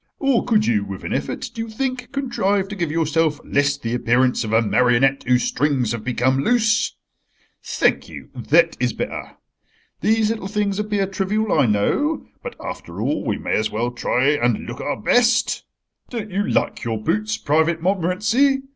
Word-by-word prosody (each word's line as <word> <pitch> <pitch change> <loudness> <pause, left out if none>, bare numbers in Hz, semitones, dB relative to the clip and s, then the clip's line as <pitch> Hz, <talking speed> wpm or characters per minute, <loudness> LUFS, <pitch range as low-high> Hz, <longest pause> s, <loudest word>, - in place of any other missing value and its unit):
Or 275 -4 +2
could 220 -3 +2
you, 105 -3 +2
with 100 -2 -7
an - - -3
effort, - - -3
do 225 - -5
you 225 - -5
think, 255 +2 -3
contrive 205 -8 0
to 205 - -5
give 170 -5 -2
yourself 160 -1 +1
less 140 0 +1
the 115 -4 -4
appearance 125 +1 +2
of 110 - -4
a 110 - +5
marionette 125 +4 +3
whose 125 -1 +3
strings 135 -4 0
have 115 -2 -4
become 130 +2 +1
loose? 225 0 +2 0.7
Thank - - 0
you, - - -10
that - - +3
is - - 0
better. - - -5 0.7
These 220 0 +2
little 215 -4 -4
things 205 -1 -1
appear 210 -2 0
trivial, 195 +3 -1
I 125 - +3
know, 195 - 0 0.2
but, 485 - -7
after - - -7
all, - - -1
we - - -1
may - - -3
as 110 0 0
well 120 +3 -2
try 125 +2 +1
and 120 -6 +1
look 120 +1 -7
our 145 - -3
best— 240 -1 +2 0.4
"Don't 220 -4 -5
you 200 +2 -1
like - - 0
your 115 -1 -2
boots, 110 0 -1
Private 160 +6 +1
Montmorency? 210 +10 +2
165 Hz, 175 wpm, -21 LUFS, -, 0.7 s, a